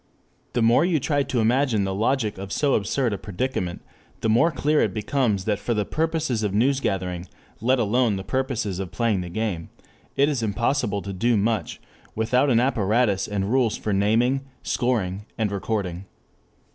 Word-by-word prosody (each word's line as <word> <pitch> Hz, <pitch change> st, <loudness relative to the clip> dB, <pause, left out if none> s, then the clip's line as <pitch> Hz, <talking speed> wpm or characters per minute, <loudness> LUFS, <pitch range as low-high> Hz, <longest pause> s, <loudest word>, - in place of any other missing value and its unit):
The 120 Hz, -, +1 dB
more 115 Hz, +5 st, +5 dB
you 170 Hz, -3 st, +2 dB
try 145 Hz, +2 st, +1 dB
to 130 Hz, -3 st, -1 dB
imagine 120 Hz, -2 st, +2 dB
the 95 Hz, 0 st, -1 dB
logic 110 Hz, 0 st, 0 dB
of 95 Hz, 0 st, -7 dB
so 145 Hz, +4 st, +1 dB
absurd 115 Hz, +3 st, 0 dB
a 100 Hz, -, -4 dB
predicament, 100 Hz, -4 st, -3 dB, 0.4 s
the 110 Hz, -, +1 dB
more 120 Hz, +10 st, +4 dB
clear 150 Hz, +1 st, +1 dB
it -, -, 0 dB
becomes 105 Hz, -3 st, 0 dB
that 105 Hz, -2 st, 0 dB
for 120 Hz, +2 st, -1 dB
the 105 Hz, -1 st, 0 dB
purposes 160 Hz, -6 st, -1 dB
of 105 Hz, -3 st, -1 dB
newsgathering, 95 Hz, -7 st, 0 dB, 0.3 s
(let 130 Hz, +4 st, +3 dB
alone 120 Hz, -1 st, +2 dB
the 95 Hz, -, -4 dB
purposes 125 Hz, -7 st, -2 dB
of 95 Hz, -2 st, -4 dB
playing 115 Hz, -5 st, 0 dB
the 90 Hz, -, -6 dB
game) 95 Hz, -4 st, -3 dB, 0.5 s
it 140 Hz, -, +4 dB
is 145 Hz, -5 st, -1 dB
impossible 110 Hz, -1 st, 0 dB
to 100 Hz, -, -5 dB
do 115 Hz, +4 st, +2 dB
much 110 Hz, +2 st, -1 dB, 0.4 s
without 125 Hz, +5 st, +2 dB
an 120 Hz, -3 st, +4 dB
apparatus 110 Hz, -4 st, +1 dB
and 100 Hz, 0 st, -2 dB
rules 125 Hz, -4 st, +2 dB
for 105 Hz, -, -2 dB
naming, 115 Hz, +7 st, +2 dB, 0.2 s
scoring, 105 Hz, -5 st, -1 dB
recording. 100 Hz, -3 st, -2 dB
110 Hz, 170 wpm, -24 LUFS, 100-130 Hz, 0.5 s, more